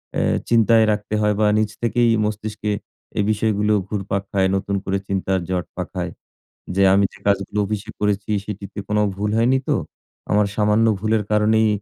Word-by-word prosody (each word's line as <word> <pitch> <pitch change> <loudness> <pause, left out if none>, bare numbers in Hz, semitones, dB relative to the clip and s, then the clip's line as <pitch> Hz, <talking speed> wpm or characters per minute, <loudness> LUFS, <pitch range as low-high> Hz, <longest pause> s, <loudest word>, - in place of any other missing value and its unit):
অ্যা - - +1 0.3
চিন্তায় 115 -1 +5
রাখতে 105 0 -3
হয় 105 0 +2
বা 105 - +4
নিজ 110 -1 +1
থেকেই 120 0 +2 0.2
মস্তিষ্কে 105 0 -3 0.5
এই 105 - +3
বিষয়গুলো 105 0 +1
ঘুরপাক 100 -1 -2
খায় 95 -1 +2
নতুন 100 +1 -1
করে 95 0 -1
চিন্তার 95 -1 0
জট 90 -1 -1
পাখায়। - - -4 0.6
যে 100 - +3
আমি 100 +1 +4
যে - - -16
কাজগুলো 100 +1 +1
অফিসে 105 0 -4
করেছি 105 0 0
সেটিতে 100 0 -7
কোন 105 - 0 0.2
ভুল 105 +2 -2
হয়নি 125 +3 +3
তো? - - +2 0.6
আমার 105 0 +3
সামান্য 105 +1 +3
ভুলের 110 +1 +1
কারণেই 110 +1 +3
105 Hz, 165 wpm, -21 LUFS, 100-110 Hz, 0.6 s, চিন্তায়